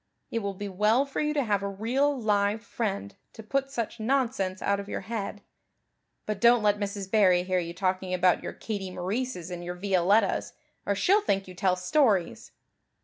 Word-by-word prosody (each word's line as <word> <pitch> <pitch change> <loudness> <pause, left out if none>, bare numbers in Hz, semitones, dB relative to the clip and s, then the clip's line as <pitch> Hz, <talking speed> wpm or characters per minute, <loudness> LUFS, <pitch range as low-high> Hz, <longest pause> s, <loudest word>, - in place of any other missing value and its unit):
It 230 - 0
will 200 -2 -4
be 205 +2 -5
well 210 +7 +2
for 275 - -3
you 300 0 +1
to 285 - +2
have 205 -4 0
a 200 - -2
real 255 +8 0
live 210 0 +1
friend 200 - -3 0.2
to 220 - -10
put 275 +4 -1
such 235 -3 -4
nonsense 225 -6 0
out 200 0 0
of 200 0 -7
your - - -3
head. 210 -2 -5 0.8
But 215 -2 -3
don't 235 -1 +6
let 205 0 +3
Mrs. 200 -1 -4
Barry 185 -5 +4
hear 185 0 0
you 170 -1 -5
talking 185 -1 -1
about 180 -1 +3
your - - -5
Katie 200 -4 -5
Maurices 185 0 -3
and 175 -1 -5
your 175 +1 -5
Violettas 195 +3 +2 0.3
or 200 - +2
she'll 390 - +3
think 195 - 0
you 185 - -9
tell 185 0 +1
stories." 190 - +1
200 Hz, 190 wpm, -27 LUFS, 185-230 Hz, 0.8 s, don't